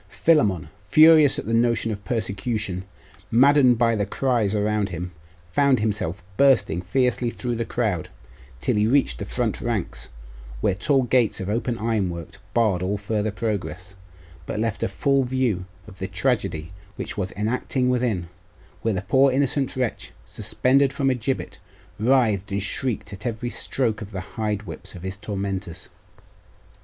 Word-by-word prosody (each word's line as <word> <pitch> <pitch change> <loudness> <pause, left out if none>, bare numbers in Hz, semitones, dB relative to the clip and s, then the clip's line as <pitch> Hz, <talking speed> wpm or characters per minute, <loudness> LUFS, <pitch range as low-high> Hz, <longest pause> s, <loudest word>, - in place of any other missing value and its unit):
Philammon, 105 - +2 0.2
furious 155 -2 +7
at - - -4
the 115 - -2
notion 115 -1 +2
of 100 -1 -6
persecution, 100 -3 -2 0.4
maddened 130 0 +5
by 115 0 +3
the 100 -1 -1
cries 115 -3 +1
around 105 -1 +1
him, 90 +1 -5 0.4
found 140 +4 +4
himself 105 -5 -2
bursting 110 -11 +4
fiercely 125 +5 +1
through 120 0 -3
the 115 0 -2
crowd, 105 -9 -1 0.5
till 65 - +1
he 105 +1 +3
reached 135 +4 +2
the 100 - -4
front 115 +1 -2
ranks, 100 - -3 0.5
where 95 - +2
tall 135 +8 +2
gates 125 -2 +2
of 95 0 -4
open 115 +2 -1
ironwork 95 -8 -2 0.2
barred 110 -7 +2
all 95 +3 -1
farther 105 +1 -1
progress, 95 -5 -4 0.5
but - - -3
left 115 -1 -1
a - - +1
full 135 +7 +1
view 125 -8 0 0.2
of 95 - -13
the - - -3
tragedy 80 +2 -1 0.2
which - - -5
was 95 -2 -3
enacting 125 +4 -1
within, 120 -8 0 0.5
where 110 -3 0
the 95 - -3
poor 135 +7 +4
innocent 135 0 0
wretch, 125 -3 -3
suspended 135 +1 +1
from 135 -1 +1
a - - +3
gibbet, 125 +2 -3 0.4
writhed 110 -5 +2
and 100 0 -1
shrieked 110 +1 -2
at 105 +5 -5
every 120 +1 -3
stroke 115 -5 -1
of 100 - -7
the 95 -3 -5
hide 105 +1 -3
whips 85 -5 -8
of 90 - -10
his 95 0 -4
tormentors. 95 -3 -4
110 Hz, 155 wpm, -24 LUFS, 100-125 Hz, 0.5 s, furious